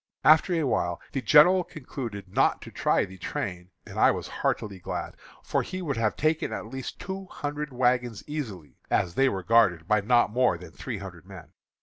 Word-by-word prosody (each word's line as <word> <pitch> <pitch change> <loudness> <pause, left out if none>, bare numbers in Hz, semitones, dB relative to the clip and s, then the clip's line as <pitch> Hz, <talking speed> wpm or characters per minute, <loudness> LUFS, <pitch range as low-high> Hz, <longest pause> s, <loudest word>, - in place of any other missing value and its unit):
"After 155 +5 +5
a 165 - +1
while 85 -10 0
the 135 - -2
general 170 - +6
concluded 125 - -7
not 90 - +2
to - - -10
try - - +1
the 95 -1 -13
train, 90 0 -4 0.2
and - - -7
I - - +6
was - - -2
heartily 100 -3 -2
glad, - - -5 0.3
for - - 0
he 185 - -5
would 140 -7 -2
have 110 -2 +1
taken 155 +1 0
at - - -4
least 130 +3 -6
two 190 +1 -6
hundred 145 -2 -5
wagons 125 -3 0
easily, 110 - -6
as 85 - +1
they 135 +7 +3
were 95 -4 -4
guarded 90 -6 +3
by 105 -1 +3
not 120 +1 +3
more 125 -6 +2
than 90 - -12
three 125 -5 -6
hundred 90 -3 -10
men. 90 -5 -11
115 Hz, 195 wpm, -27 LUFS, 95-145 Hz, 0.3 s, general